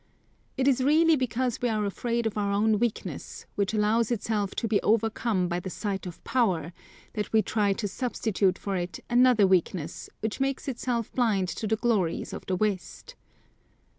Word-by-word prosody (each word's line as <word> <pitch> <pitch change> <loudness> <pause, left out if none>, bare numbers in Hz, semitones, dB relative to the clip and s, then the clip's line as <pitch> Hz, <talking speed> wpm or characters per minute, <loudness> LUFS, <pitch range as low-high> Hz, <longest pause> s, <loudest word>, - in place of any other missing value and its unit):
It 265 - +1
is 265 -2 +3
really 320 +3 +5
because 255 -2 -1
we 245 - +1
are 215 -2 0
afraid 235 +3 -1
of 220 - -1
our 205 -1 0
own 210 +1 +2
weakness, 235 -2 -3
which 200 -1 0
allows 220 +1 +2
itself 210 -3 -1
to 230 - -1
be 215 -2 +2
overcome 220 -3 +1
by 175 0 -1
the 185 - -6
sight 195 -1 -3
of 175 - -10
power, 180 - 0 0.4
that 210 -1 -3
we 220 -1 +4
try 205 -2 +1
to 205 +1 -3
substitute 205 -5 0
for 200 -1 -3
it 175 -1 -3
another 245 -3 +5
weakness 180 -3 0
which 220 +2 -3
makes 270 +1 -1
itself 240 -3 -2
blind 210 -7 +1
to 215 - -3
the 220 - +2
glories 210 -7 0
of - - -6
the 185 - 0
West. 195 -2 -3
215 Hz, 175 wpm, -27 LUFS, 195-235 Hz, 0.4 s, really